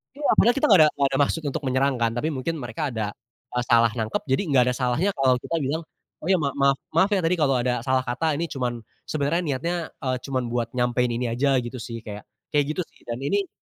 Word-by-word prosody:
Iya 290 0 -1
padahal 240 +2 +5
kita 275 - +2
nggak 195 -6 +7
ada 155 - +7
nggak 140 - +2
ada 135 - 0
maksud 165 - -1
untuk 140 - -4
menyerang 130 +1 +2
kan 115 -1 +2
tapi 150 +6 -1
mungkin 140 +4 -3
mereka 145 +5 -3
ada, 110 -3 -2 0.4
eee, 125 - +1
salah 115 -1 +5
nangkep 110 -1 -2
jadi 135 - +3
gak 125 - +6
ada - - -3
salahnya 130 +10 +1
kalau 130 -2 +4
kita 165 - -2
bilang, 150 +4 -1 0.4
"Oh - - -4
ya 185 - +5
ma 145 -3 0
maaf 140 -1 +3 0.2
maaf 195 - +4
ya 200 - +3
tadi 165 +2 +2
kalau 145 -5 +2
ada 125 -1 -1
salah 130 0 +1
kata 150 +6 0
ini 170 - -1
cuman 125 -5 -3 0.3
sebenarnya 155 +3 0
niatnya, 155 +3 -1 0.2
eee, 130 -1 -1
cuman 130 -2 -2
buat 120 -1 -1
nyampein 125 0 +1
ini 120 +1 -2
aja," 135 +4 +2
gitu 120 +1 -6
sih 115 -1 -6
kayak 105 -1 -7 0.3
kayak 145 -1 +4
gitu 180 - -2
sih - - -26
dan 120 0 -4
ini 190 +9 0
135 Hz, 240 wpm, -24 LUFS, 120-155 Hz, 0.4 s, nggak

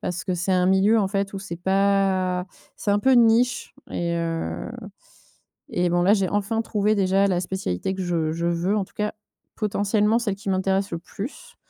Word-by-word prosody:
parce 180 -1 -3
que 185 -3 -2
c'est 175 +2 -1
un 180 0 +3
milieu, 195 +4 +4
en 195 - 0
fait, 195 0 -2
où 195 - -4
c'est 190 -3 -6
pas 190 -1 +1 0.3
c'est 205 - -2
un 205 - +3
peu 265 +4 +4
une 240 -2 +7
niche 240 +2 +1 0.2
et 170 0 -2
heu 165 - -3 1.0
et 175 0 +1
bon, 175 0 +2
là, 195 +3 +5
j'ai 195 -3 +2
enfin 205 +2 0
trouvé, 210 -1 +1
déjà, 195 0 +2
la 180 -2 +1
spécialité 190 - -3
que 190 - -4
je 165 -3 -1
je 170 +1 -3
veux, 175 +4 0
en 200 - 0
tout - - -24
cas, 210 0 -2 0.4
potentiellement 210 +1 +1
celle 215 -5 -1
qui 200 0 -8
m'intéresse 190 +1 0
le 170 - -3
plus, 270 - -9
195 Hz, 200 wpm, -24 LUFS, 180-205 Hz, 1.0 s, une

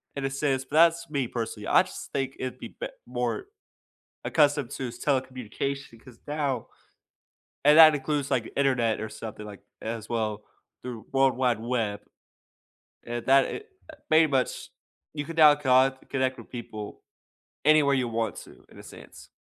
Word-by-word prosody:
in 140 -1 -3
a - - 0
sense, 135 -1 -1
but 145 - -7
that's 170 +1 +4
me 140 -4 -1
personally. 115 -3 -5
I - - +5
just - - -10
think 135 -1 -2
it'd 130 -1 -4
be - - -8
bet - - -7
more 385 - -3 0.8
accustomed 145 -4 +2
to 130 - -4
s 120 - -9
telecommunication 130 -1 -3
'cause 120 -3 -15
now 145 -5 -2 1.0
and 150 +1 +7
that 155 -1 +10
includes 145 0 -2
like, 125 -4 0
Internet 125 -5 +1
or 110 - -4
something 110 -1 -8
like, 105 -2 -10 0.2
a - - -8
as 110 -1 -5
well 110 -2 -2 0.4
through 120 -3 -7
World 135 -2 +3
Wide 125 -3 +1
Web. 115 -4 -2 1.0
And 120 0 -5
that 135 0 +6
it 425 - -6 0.4
pretty 160 +1 +6
much 135 -4 -1 0.4
you 145 -1 -4
can 165 0 -7
now 155 -2 +8
con 130 -1 +3
connect 130 -1 -1
with - - -11
people 110 -4 -8 0.6
anywhere 150 -2 +5
you 125 -2 0
want 115 -2 -2
to, - - -13
in - - -17
a - - -11
sense. - - -13
130 Hz, 165 wpm, -27 LUFS, 115-145 Hz, 1.0 s, that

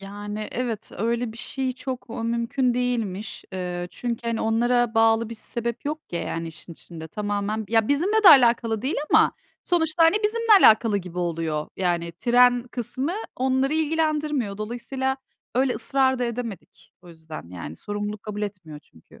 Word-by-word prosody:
Yani, 205 +2 -6
evet, 230 -3 -3
öyle 230 +1 -1
bir 230 - -12
şey 260 0 -2
çok, 255 -2 -6
ooo, 230 -1 -4
mümkün 235 +2 0
değilmiş. 230 -5 -2
İii, 180 -1 -4
çünkü, 235 -1 -4
hani, 230 - -1
onlara 240 +1 +2
bağlı 225 0 +3
bir 230 - -6
sebep 235 +1 -4
yok, 300 +2 -3
yani, 165 0 -3
işin 165 +1 -10
içinde 160 -1 -10
tamamen, 205 +2 -2
ya, 225 0 +2
bizimle 385 +10 +2
de - - +11
alakalı 235 -6 +5
değil 265 +4 -1 0.2
ama - - +5 0.3
sonuçta, 330 -2 +2
hani, 325 +5 +5
bizimle 440 -2 +5
alakalı 220 -1 +5
gibi 180 -2 -8
oluyor. 165 -3 -2
Yani, 175 -2 -1
tren 245 +5 +4
kısmı 260 +6 -3 0.2
onları 265 +3 +1
ilgilendirmiyor. 300 -8 0
Dolayısıyla 260 +4 -3 0.4
öyle 255 0 +2
ısrar 265 +2 +1
da 250 - 0
edemedik 235 -5 -6
o 175 - -15
yüzden. 160 - -10
Yani, 85 -3 -7
sorumluluk 205 - -5
kabul 210 -1 -5
etmiyor 185 -7 -6
çünkü. 80 - -21
230 Hz, 155 wpm, -24 LUFS, 200-260 Hz, 0.4 s, de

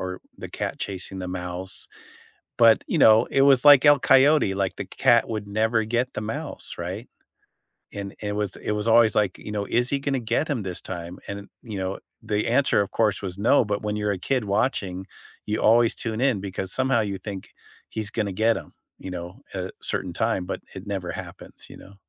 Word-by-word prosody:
or - - -17 0.2
the - - -8
cat - - -4
chasing 95 -1 -4
the 90 - -5
mouse, 90 0 -4 0.7
but, 115 -1 +6
you - - 0
know, 110 0 +6
it 135 - +3
was, 135 -1 +5
like, 145 -1 +8
El 145 -2 +7
Coyote, 135 -5 +5
like, 95 -1 -1
the - - -3
c - - -21
cat 115 -1 +4
would 105 -2 -4
never 110 +2 +1
get 120 +3 -1
the - - -3
mouse, 110 +1 -6
right? 95 +7 -6 0.9
And 100 -1 -6
it 105 -1 -2
was 105 -2 -2
it - - -3
was 105 0 -2
always, 115 -1 +5
like, 105 -3 +1
you - - -8
know, 105 -1 -2
is 120 +4 +1
he 140 - +1
gonna 135 -2 -1
get 120 +8 -1
him 125 -8 -2
this 90 -2 -4
time, 85 -1 -7
and, 100 0 -7
you 110 -4 -6
know, 95 +1 -3 0.2
the 105 -1 -1
answer, 130 -3 +3
of 100 - -6
course, 105 -3 +1
was 95 -1 -5
no, 120 +5 +4
but 105 -1 -2
when 105 0 -2
you're 105 -1 0
a 95 - -4
kid 125 +6 -1
watching, 100 -3 -1 0.4
you 105 +1 -1
always 115 +1 +5
tune 115 0 -3
in 130 -7 +2
because 95 -1 -4
somehow 130 -2 +2
you 100 -3 -2
think 100 -2 -7 0.4
he's 110 -2 -4
gonna 105 -2 -2
get 110 +4 +2
him, - - -13 0.2
you 95 - -8
know, 90 0 -7
at 95 -1 -3
a 95 - -6
certain 90 - -3
time, 105 +1 0
but 90 - -5
it 95 +2 -9
never 95 -3 -3
happens, - - -10
you - - -11
know. 100 +1 -15
105 Hz, 215 wpm, -24 LUFS, 95-115 Hz, 0.9 s, like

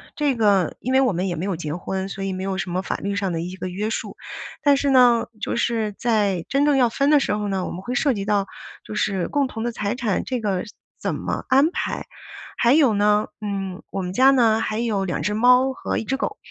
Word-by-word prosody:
这 290 -3 +1
个 200 -7 +2
因 255 - -2
为 265 - +5
我 255 -6 +2
们 180 +3 -1
也 175 - -2
没 170 - -3
有 195 -2 -1
结 155 -2 -4
婚， 190 +3 -3
所 195 0 -5
以 195 - -2
没 185 0 -4
有 190 0 -2
什 190 - -3
么 180 +2 -2
法 - - -2
律 200 +1 -3
上 195 -3 -1
的 165 - -2
一 180 +2 -5
个 185 -1 -5
约 205 +4 -3
束， - - -4 0.5
但 285 -1 +4
是 280 0 +1
呢， 245 -3 +5 0.2
就 - - -2
是 225 -3 0
在 205 -6 0
真 275 +3 +1
正 290 -1 +3
要 250 -3 +4
分 275 +5 +1
的 295 -1 +6
时 270 - 0
候 210 0 -2
呢 190 -2 -1
我 - - -5
们 180 - -6
会 245 +6 -4
涉 280 +1 +2
及 200 -3 -3
到， 200 -1 +1 0.4
就 - - -7
是 195 -3 0
共 285 -2 +1
同 225 -3 -6
的 240 - -1
财 210 -1 -2
产 230 -6 -1
这 255 -2 -2
个 200 -5 -1 0.4
怎 - - -1
么 - - -3
安 275 +5 +4
排。 - - -3 0.5
还 240 +2 +3
有 280 -8 +4
呢， 210 +1 +2 0.2
嗯， 195 -3 -4
我 195 - -3
们 180 0 -4
家 260 +6 +6
呢 230 -5 +4
还 215 - -2
有 220 -4 0
2 175 - -2
只 210 - 0
猫 250 +4 +4
和 - - -3
1 - - -2
只 270 +5 -2
狗， 415 +9 -3
210 Hz, 265 characters per minute, -22 LUFS, 195-250 Hz, 0.5 s, 的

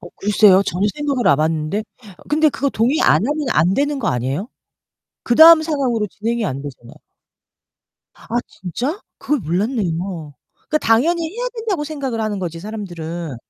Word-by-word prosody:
어 175 - -11
글쎄요. 200 -1 +4
전혀 190 +1 -1
생각을 280 -4 -1
안해봤는데 155 +7 0 0.4
근데 310 +1 +3
그거 280 0 -1
동의 250 +9 +1
안 - - +5
하면 295 0 -2
안 180 +4 +2
되는 285 +1 0
거 250 - -1
아니에요? 130 - -2 0.8
그다음 320 +6 +8
상황으로 260 -9 -1
진행이 225 +3 -3
안되잖아요. 135 -4 -7 1.2
아 - - -18 0.2
진짜? 250 - -5 0.2
그걸 295 -2 -1
몰랐네요. 175 - -2 0.3
그니까 305 - +1
당연히 305 +9 +2
해야 - - -2
된다고 425 -9 -2
생각을 275 -7 -4
하는 210 -2 -2
거지, 170 -3 -5
사람들은. 175 - -6
215 Hz, 340 characters per minute, -19 LUFS, 175-290 Hz, 1.2 s, 그다음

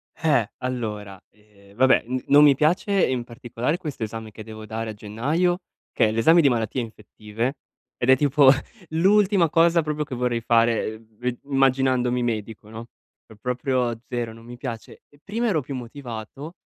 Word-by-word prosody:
Eh, 140 -9 +1
allora, 105 -6 -4
ehm, 100 -1 -23
vabbè, 130 +2 +4
n 130 0 -3
non 145 +1 +7
mi 145 -2 +7
piace 175 - +1 0.2
in 125 -2 -1
particolare 120 +5 -3
questo 145 -9 -6
esame 110 0 -6
che 110 +1 -10
devo 110 0 -10
dare 110 0 -4
a - - -8
gennaio, 145 - -1 0.3
che - - +2
è - - -1
l'esame 160 +10 +5
di 140 - +4
Malattie 120 +1 -1
Infettive 110 +3 -5 0.4
ed 125 - -1
è 130 - +7
tipo 145 -1 +5 0.4
l'ultima 190 +1 +3
cosa 170 +1 +4
proprio 150 -1 -3
che 135 -3 -6
vorrei 120 -1 -1
fare, 115 -1 +2
uhm, 110 -1 -20
ve 125 0 -3
immaginandomi 130 -2 +1
medico, 110 -2 -4
no. 115 +1 -8 0.4
Po 110 - -16
proprio 125 -1 -1
zero, 120 -2 -3
non 115 +1 -15
mi 120 0 -10
piace. 120 -4 -7
E 145 - -24
prima 230 +4 -2
ero 165 -8 +1
più 135 +1 -7
motivato, 125 +4 -8
125 Hz, 170 wpm, -23 LUFS, 110-145 Hz, 0.4 s, non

